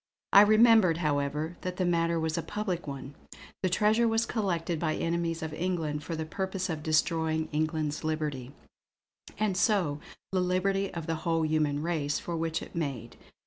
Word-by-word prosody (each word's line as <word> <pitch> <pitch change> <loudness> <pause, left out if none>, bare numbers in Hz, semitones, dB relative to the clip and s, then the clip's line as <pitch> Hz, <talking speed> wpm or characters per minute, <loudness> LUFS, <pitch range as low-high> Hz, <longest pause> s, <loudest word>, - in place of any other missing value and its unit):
I 200 - +10
remembered, 215 -4 +6
however, 150 +1 -1
that 185 0 -4
the 185 - +1
matter 170 -1 +1
was 160 0 -1
a 165 - -1
public 190 -4 -3
one. 135 0 -6 0.5
The 185 - +1
treasure 215 +5 +3
was 225 0 +2
collected 175 -8 -1
by 155 -1 0
enemies 165 -1 -1
of 160 -1 -4
England 160 -4 -2
for 165 - -4
the 160 0 -3
purpose 190 +2 -3
of 155 -2 -4
destroying 160 0 +1
England's 155 -1 -1
liberty, 150 -5 -2 0.9
and 210 -2 0
so 185 -8 +2 0.3
the 185 -1 +1
liberty 195 +2 0
of 165 -2 -5
the 165 -1 -2
whole 165 -1 +1
human 155 -2 0
race 155 -4 -1
for 170 - -4
which 165 0 -2
it - - -12
made. 135 -8 -4
165 Hz, 170 wpm, -29 LUFS, 155-185 Hz, 0.9 s, I